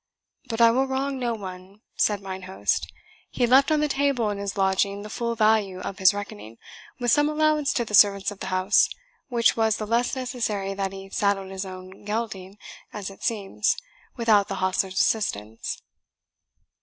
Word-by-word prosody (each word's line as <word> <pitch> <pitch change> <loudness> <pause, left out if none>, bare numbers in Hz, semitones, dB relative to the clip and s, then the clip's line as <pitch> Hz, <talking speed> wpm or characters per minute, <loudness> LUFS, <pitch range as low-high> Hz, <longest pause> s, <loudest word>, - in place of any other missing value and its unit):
"But 225 0 -1
I 230 0 +7
will 265 +3 +1
wrong 265 +1 -2
no 240 -2 -1
one," 190 0 -10
said 205 -2 +1
mine 190 -1 -6
host; 100 - -1 0.4
"he 245 - +1
left 265 +5 +5
on 305 -1 +3
the 300 - +2
table 275 -6 +1
in 200 - -4
his 200 0 -4
lodging 195 +1 +1
the 210 - -9
full 235 -1 -2
value 215 -4 +2
of 195 +1 -6
his 190 -1 +7
reckoning, 115 - -8 0.4
with 240 -2 +1
some 295 +4 +4
allowance 305 -2 +2
to 240 - 0
the 210 - -9
servants 200 -1 +5
of 205 - -10
the - - -5
house, 185 +2 +3 0.4
which 235 -2 +3
was 225 -1 +2
the 215 - -4
less 235 +4 +1
necessary 225 -6 -2
that 195 -1 -2
he 195 0 -10
saddled 200 -2 0
his 190 0 -4
own 185 +1 -10
gelding, 210 -3 -4 0.3
as 200 -2 -6
it 195 - -15
seems, 210 - 0 0.4
without 215 -4 +3
the 195 - -4
hostler's 190 0 0
assistance." 110 - -1
205 Hz, 180 wpm, -25 LUFS, 195-235 Hz, 0.4 s, I